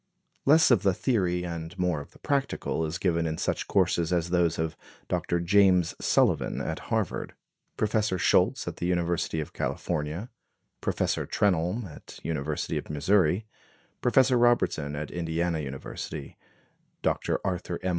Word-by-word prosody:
Less 155 0 +6
of 120 - +5
the 95 -3 +2
theory 90 -7 0
and 85 -1 -6
more 90 -5 0
of 70 - -12
the - - -19
practical 140 - -1
is 80 +3 -3
given 85 -3 +1
in 80 0 -3
such - - -1
courses 85 -3 +2
as 85 -1 0
those 85 -2 +2
of 80 -1 -2 0.3
Dr. 85 - 0
James 90 -1 +4
Sullivan, - - +2
at - - -3
Harvard; - - -1 0.4
Professor 105 -2 +1
Scholz, - - +2
at - - -4
the 90 - -2
University 85 -2 0
of 75 - -5
California; 85 +6 -3 0.5
Professor - - -1
Trenholme, 95 +3 +1
at 80 - -11
University 75 -2 -2
of - - -10
Missouri; 90 +5 +2 0.6
Professor 125 0 +4
Robertson, 100 -12 +2
at 75 0 -5
Indiana 85 -1 -1
University; 70 0 -6 0.7
Dr. - - 0
Arthur 90 -2 -2
M. 95 - 0
85 Hz, 145 wpm, -27 LUFS, 80-100 Hz, 0.7 s, Less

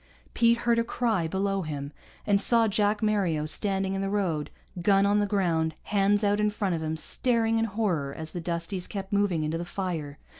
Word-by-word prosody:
Pete 235 0 +4
heard 235 0 +1
a - - +2
cry 225 -7 0
below 195 +2 -1
him, 145 -3 -5 0.3
and 200 -1 +3
saw 230 0 +5
Jack 210 +1 +1
Mario 190 -8 +1
standing 195 +3 0
in 195 - -2
the 195 - -1
road, 180 -7 -1 0.3
gun 195 +2 +4
on 205 +1 +3
the 205 - +1
ground, 165 -6 0
hands 205 +1 +2
out 205 0 +2
in 210 0 +2
front 205 -3 -2
of 165 - -2
him, 160 0 -2
staring 225 +4 +1
in 225 - +1
horror 195 -10 -1
as 160 +2 -7
the 175 - -5
Dusties 170 +2 -3
kept 195 -1 -6
moving 200 -6 +1
into 155 +2 -2
the - - -3
fire. 170 -6 -4
195 Hz, 200 wpm, -27 LUFS, 165-210 Hz, 0.3 s, saw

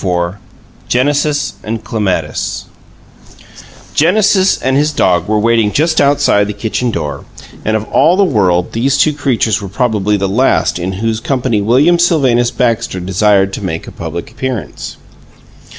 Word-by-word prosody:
IV 90 -2 -1 0.5
GENESIS 145 +3 0
AND 110 0 -4
CLEMATIS 105 -4 -2 1.3
Genesis 195 +3 +3
and 130 +1 0
his 150 +2 +2
dog 90 - +1
were 110 0 +1
waiting 115 -1 +2
just 160 +4 +1
outside 140 -8 +2
the 105 - -4
kitchen 110 +4 -2
door, 75 -10 -4 0.4
and 110 0 +1
of 110 - -5
all 175 +3 +3
the 200 - +4
world 95 - +1
these 135 +5 +1
two 150 +2 +3
creatures 120 -7 0
were 100 - -6
probably 105 -1 0
the 100 0 -1
last 95 - +1
in 90 +2 -3
whose 110 +3 -2
company 125 -3 -1
William 140 +11 +3
Sylvanus 130 -9 +2
Baxter 115 -7 -1
desired 95 +1 +1
to 100 - -5
make 80 -3 -4
a - - -10
public - - -7
appearance. 130 -5 -5
115 Hz, 150 wpm, -14 LUFS, 100-140 Hz, 1.3 s, the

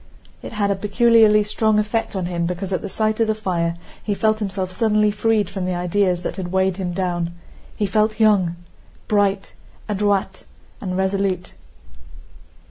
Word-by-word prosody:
It - - -8
had 205 -2 0
a - - +1
peculiarly 215 +1 +4
strong 215 +1 +1
effect 215 +1 -1
on 185 -2 -1
him 170 -1 -1
because 180 +2 -4
at 185 - -1
the 200 - -5
sight 215 +2 -1
of 225 - +3
the 220 - +1
fire 170 -5 -1 0.3
he 205 - -1
felt 215 +1 +1
himself 190 -3 -3
suddenly 210 +1 +2
freed 215 -1 +1
from 190 -1 -4
the 180 -1 -1
ideas 180 0 0
that - - -4
had 180 -2 -4
weighed 190 0 +1
him 185 -2 -3
down. 175 -2 -2 0.4
He 210 - 0
felt 215 +2 +1
young, 200 -6 +3 0.5
bright, 200 -2 +1 0.3
adroit, 205 -2 0 0.4
and 185 -2 -3
resolute. 190 -1 -1
200 Hz, 165 wpm, -21 LUFS, 185-215 Hz, 0.5 s, peculiarly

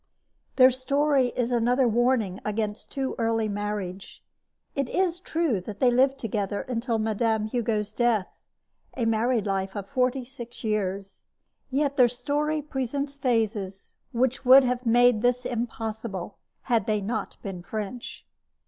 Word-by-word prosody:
Their 260 -1 +7
story 275 +1 +2
is 245 -1 0
another 245 +2 +3
warning 230 -4 +1
against 210 0 -3
too 270 -1 -2
early 225 -1 +1
marriage. 205 -2 -5 0.5
It 275 -3 -1
is 355 -2 0
true 320 - 0
that 205 +2 -8
they 250 -2 +4
lived 265 +2 +3
together 205 -4 -2
until 235 -1 -1
Mme. 220 0 0
Hugo's 215 -3 -1
death 230 -5 +1 0.6
a 240 - 0
married 225 0 +1
life 195 0 -2
of 200 -1 -5
forty 255 0 0
six 240 -2 -9
years 200 -3 -3 0.4
yet 280 +1 0
their 250 -2 +7
story 290 +5 -1
presents 280 0 -3
phases 220 -7 -1 0.2
which 255 +2 0
would 265 +1 +8
have 250 -1 -1
made 240 -1 +5
this 245 +1 +1
impossible 225 -5 -4 0.2
had 230 -6 +1
they 215 -1 +1
not 215 +3 -4
been 190 -3 -5
French. 215 +5 -6
235 Hz, 140 wpm, -26 LUFS, 210-255 Hz, 0.6 s, would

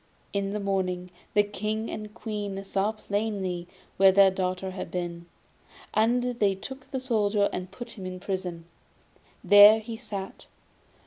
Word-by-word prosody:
In 200 -1 -1
the 210 - -2
morning 185 -2 -1 0.2
the 205 - +6
King 215 +2 -3
and 215 - -5
the - - -10
Queen 210 -3 -5
saw 195 +2 0
plainly 200 -5 -3 0.3
where 195 0 +7
their 195 0 +6
daughter 185 0 -2
had 185 - -6
been, 170 -1 -4 0.7
and 235 +3 +3 0.2
they 200 -2 +3
took 265 +7 -9
the 265 - -3
Soldier 210 -5 +1
and 185 0 -4
put 235 +5 -9
him 190 -5 -7
into 185 0 -8
prison. 180 -4 -3 0.8
There 205 +3 +9
he 225 +1 -7
sat. 200 -5 -7
200 Hz, 150 wpm, -27 LUFS, 185-215 Hz, 0.8 s, There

